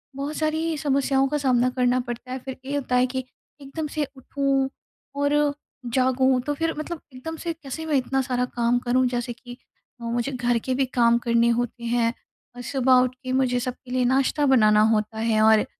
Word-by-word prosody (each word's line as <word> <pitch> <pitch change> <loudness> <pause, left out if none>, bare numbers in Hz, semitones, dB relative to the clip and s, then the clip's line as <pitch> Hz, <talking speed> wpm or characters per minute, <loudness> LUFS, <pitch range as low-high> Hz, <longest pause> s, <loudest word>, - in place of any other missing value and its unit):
बहुत 285 +2 -4
सारी 315 +1 -1
समस्याओं 275 -2 +1
का 295 +2 -1
सामना 255 -3 +2
करना 250 0 +3
पड़ता 245 +1 -6
है। 260 - -3
फिर 265 -1 -6
ये 280 - -3
होता 255 -3 -1
है 250 - +4
कि, 260 0 -3 0.4
एकदम 295 +3 -5
से 295 -1 -2
उठूँ 270 0 0 0.5
और 285 0 +2 0.6
जागूँ। 260 0 +3
तो 290 +4 -2
फिर 325 +2 -1
मतलब 330 +1 -5
एकदम 290 +6 -6
से 335 -1 -2
कैसे 315 0 -7
मैं 310 -2 0
इतना 270 +1 +1
सारा 250 -1 -1
काम 240 0 +2
करूँ, 255 +1 +1
जैसे 245 0 -3
कि 245 +1 -12 0.4
ओ 230 - -4
मुझे 240 +3 -1
घर 240 -2 0
के 260 - 0
भी 270 +1 +2
काम 235 -2 +3
करने 235 0 +3
होते 240 0 -1
हैं, 235 0 +1 0.4
और 245 - -7
सुबह 260 +1 +2
उठ 255 0 -3
के 255 - -4
मुझे 255 -2 +2
सबके 255 0 -6
लिए 255 0 +1
नाश्ता 270 +3 +2
बनाना 215 -5 +5
होता 215 +1 -1
है 220 -1 +2
और, 220 0 +5
255 Hz, 200 wpm, -24 LUFS, 245-275 Hz, 0.6 s, बनाना